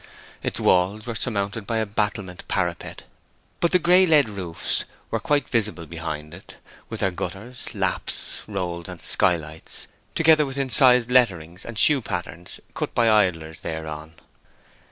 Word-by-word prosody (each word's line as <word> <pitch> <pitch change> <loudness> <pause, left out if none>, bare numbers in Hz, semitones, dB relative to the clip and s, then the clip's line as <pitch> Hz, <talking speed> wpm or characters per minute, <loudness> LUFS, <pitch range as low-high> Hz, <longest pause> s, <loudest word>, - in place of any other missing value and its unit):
Its - - -3
walls 95 +4 +2
were 120 - -4
surmounted 100 -2 -2
by 115 - -1
a 110 - 0
battlemented 100 -3 -3
parapet; 85 -2 -3 0.6
but 170 - +2
the 180 - +5
gray 180 +2 +5
lead 150 -7 +4
roofs 90 -5 -3 0.3
were - - 0
quite 145 -4 0
visible 105 -7 -1
behind 75 -1 -6
it, - - -12 0.3
with 110 - -5
their 95 -2 +2
gutters, 100 +8 -6
laps, - - -2
rolls, 90 -4 -4
and 90 -1 -9
skylights, 80 -3 0 0.3
together 160 -2 +5
with 135 -1 -5
incised 125 -2 +5
letterings 90 -8 +2
and 115 -2 -8
shoe 140 +5 +6
patterns 90 -3 -6
cut - - -4
by 115 -2 +4
idlers 85 -7 +1
thereon. 80 0 -6
100 Hz, 145 wpm, -23 LUFS, 85-120 Hz, 0.6 s, shoe